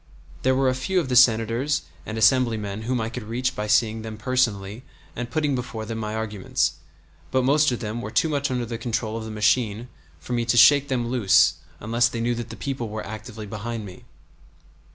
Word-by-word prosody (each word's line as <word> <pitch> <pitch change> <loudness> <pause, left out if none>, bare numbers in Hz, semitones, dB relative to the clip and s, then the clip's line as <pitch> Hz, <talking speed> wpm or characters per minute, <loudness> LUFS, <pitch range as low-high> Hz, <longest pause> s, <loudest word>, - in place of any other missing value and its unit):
There 130 0 +2
were 135 0 +2
a 130 - +3
few 155 +9 0
of 150 -7 -3
the 125 - 0
Senators 120 +3 +3 0.2
and 110 - -4
Assemblymen 110 -3 +2
whom 125 0 0
I 110 - -1
could 125 +2 -6
reach 120 +4 -2
by 105 - -3
seeing 110 +1 +2
them 110 -1 -7
personally 110 -4 -1 0.3
and 120 -1 -4
putting 150 +1 0
before 125 -3 -4
them 110 0 -5
my 110 0 -3
arguments; 105 -3 -1 0.6
but 130 -1 +1
most 145 +2 +3
of 120 - -3
them 110 +1 -4
were 105 - -5
too 110 +8 +2
much 145 -2 -1
under 125 -2 -1
the 115 0 -5
control 115 -2 -2
of 115 -1 -5
the - - -6
machine 110 +2 +1 0.3
for 105 +10 -6
me 120 -1 +1
to 120 +1 +1
shake 145 +3 +7
them 125 -4 -1
loose 105 -9 +4 0.3
unless 115 +3 +2
they 115 - -5
knew 120 +1 0
that 120 -1 -5
the 115 - -7
people 130 -5 -4
were 110 0 -5
actively 110 0 -8
behind 110 +1 -5
me. 90 -2 -11
115 Hz, 210 wpm, -24 LUFS, 110-130 Hz, 0.6 s, shake